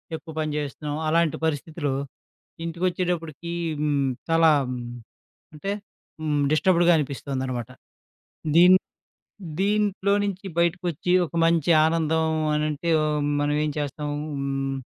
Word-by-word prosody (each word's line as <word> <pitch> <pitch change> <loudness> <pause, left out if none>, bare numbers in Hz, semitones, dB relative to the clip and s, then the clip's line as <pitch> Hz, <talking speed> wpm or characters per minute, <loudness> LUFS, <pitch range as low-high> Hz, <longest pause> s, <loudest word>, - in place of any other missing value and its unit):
ఎక్కువ 160 0 -9
పని 155 -1 -1
జేస్తున్నాం. 145 +1 -4
అలాంటి 165 -1 +2
పరిస్థితులో 150 -1 -2 0.7
ఇంటికొచ్చేటప్పడికి 170 -2 -2 0.3
హ్మ్. 140 -3 +1 0.2
చాలా 165 0 +5 0.2
హ్మ్. 125 -1 -4 0.7
అంటే. 195 +7 -3 0.5
హ్మ్. 150 -2 0
డిస్టర్బ్డ్‌గా 175 +1 +4
అనిపిస్తోందనమాట. 130 -4 -3 0.9
దీన్ 180 +2 +8 0.9
దీంట్లో 200 -1 +1
నుంచి 195 0 -4
బయటకొచ్చి 170 0 0
ఒక - - -17
మంచి 165 0 +2
ఆనందం 160 0 +1 0.3
అనంటే 150 +2 -1 0.5
మనం 145 0 +1
ఏం 150 - 0
చేస్తం? 145 0 -3 0.3
హ్మ్. 135 0 -2
160 Hz, 100 wpm, -25 LUFS, 145-170 Hz, 0.9 s, దీన్